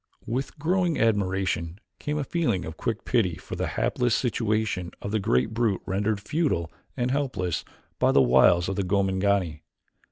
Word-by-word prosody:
With 130 Hz, +7 st, -3 dB
growing 175 Hz, +2 st, +1 dB
admiration 95 Hz, -5 st, 0 dB, 0.2 s
came 150 Hz, 0 st, -2 dB
a 150 Hz, -, 0 dB
feeling 125 Hz, -, 0 dB
of 80 Hz, -, -7 dB
quick 115 Hz, +4 st, -3 dB
pity 105 Hz, -9 st, +1 dB
for -, -, -8 dB
the -, -, -2 dB
hapless 125 Hz, -2 st, +1 dB
situation 110 Hz, -6 st, 0 dB
of 100 Hz, -, -5 dB
the 110 Hz, -, +1 dB
great 65 Hz, -, +1 dB
brute 110 Hz, -5 st, 0 dB
rendered 100 Hz, +2 st, 0 dB
futile 105 Hz, -, -1 dB, 0.3 s
and 125 Hz, +1 st, 0 dB
helpless 125 Hz, -, -1 dB, 0.4 s
by -, -, +4 dB
the -, -, +5 dB
wiles 70 Hz, +7 st, +5 dB
of 95 Hz, 0 st, -3 dB
the 100 Hz, -, +1 dB
Gomangani. 95 Hz, -3 st, +1 dB
100 Hz, 160 wpm, -26 LUFS, 90-125 Hz, 0.4 s, the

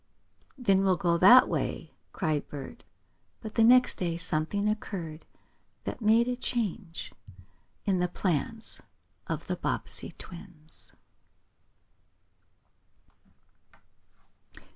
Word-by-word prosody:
"Then 200 Hz, -7 st, +3 dB
we'll 190 Hz, -2 st, +2 dB
go 170 Hz, -3 st, +1 dB
that 245 Hz, +8 st, +8 dB
way!" -, -, -3 dB, 0.2 s
cried 155 Hz, -5 st, -1 dB
Bert. 145 Hz, -, -9 dB, 0.5 s
But 220 Hz, -2 st, -8 dB
the 225 Hz, -, +3 dB
next 250 Hz, +2 st, +5 dB
day 170 Hz, -2 st, -1 dB
something 170 Hz, +5 st, 0 dB
occurred 180 Hz, -7 st, -4 dB, 0.6 s
that -, -, -5 dB
made 225 Hz, +2 st, +4 dB
a 250 Hz, -, -1 dB
change 215 Hz, -8 st, -4 dB, 0.7 s
in 195 Hz, -3 st, +1 dB
the 180 Hz, -, +1 dB
plans 185 Hz, +5 st, -1 dB, 0.5 s
of -, -, -4 dB
the -, -, -2 dB
Bobbsey -, -, -3 dB
twins. 160 Hz, -3 st, -12 dB
195 Hz, 100 wpm, -28 LUFS, 170-225 Hz, 0.7 s, that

